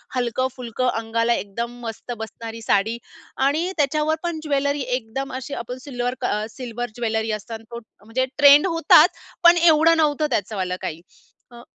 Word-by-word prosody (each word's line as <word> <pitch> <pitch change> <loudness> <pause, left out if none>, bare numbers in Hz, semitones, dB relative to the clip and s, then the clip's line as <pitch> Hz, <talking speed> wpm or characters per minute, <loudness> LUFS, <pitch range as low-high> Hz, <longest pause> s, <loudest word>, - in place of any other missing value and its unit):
हलकं-फुलकं 250 0 -2
अंगाला 230 +1 0
एकदम 235 +4 -4
मस्त 225 +2 -6
बसणारी 225 +1 -7
साडी 220 +1 +1 0.5
आणि 325 +6 0
त्याच्यावर 300 +1 +1
पण 340 -2 -2
ज्वेलरी 285 -1 0
एकदम 255 +3 -5
अशी 260 +2 -6
आपण 245 0 -5
सिल्वर 245 -3 -3
क 245 - 0 0.2
सिल्वर 240 0 -6
ज्वेलरी 225 -2 -1
असताना 220 +1 -6
तो 235 - -6 0.3
म्हणजे 250 +4 0
ट्रेंड 290 +3 +7
होताच, 330 -1 +6 0.3
पण 345 0 +8
एवढं 330 -1 +5
नव्हतं 305 -1 +2
त्याचंवाल 200 -6 -2
काही. 160 +1 -5 0.5
अ, 240 0 -12
245 Hz, 145 wpm, -22 LUFS, 225-290 Hz, 0.5 s, पण